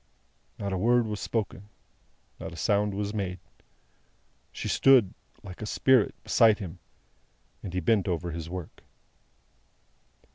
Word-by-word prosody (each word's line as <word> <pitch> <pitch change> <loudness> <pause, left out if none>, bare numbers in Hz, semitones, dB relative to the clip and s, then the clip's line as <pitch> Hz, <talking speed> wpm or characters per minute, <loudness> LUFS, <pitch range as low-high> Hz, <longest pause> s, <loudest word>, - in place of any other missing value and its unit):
Not 100 -1 -3
a 95 - -1
word 120 +3 +3
was 105 -2 -4
spoken, 105 -1 -3 0.7
not - - -6
a - - -9
sound 100 +3 +1
was 105 +1 -3
made. 95 -4 -3 1.1
She - - -5
stood, 130 -8 +5 0.3
like 90 +1 -10
a 110 - -4
spirit, 130 -1 +3
beside 110 -2 +4
him, 90 -4 -8 0.8
and 95 - -6
he 90 0 -2
bent 100 +3 +2
over 85 -1 -2
his 80 0 -6
work. 90 -3 -7
100 Hz, 135 wpm, -28 LUFS, 90-110 Hz, 1.1 s, stood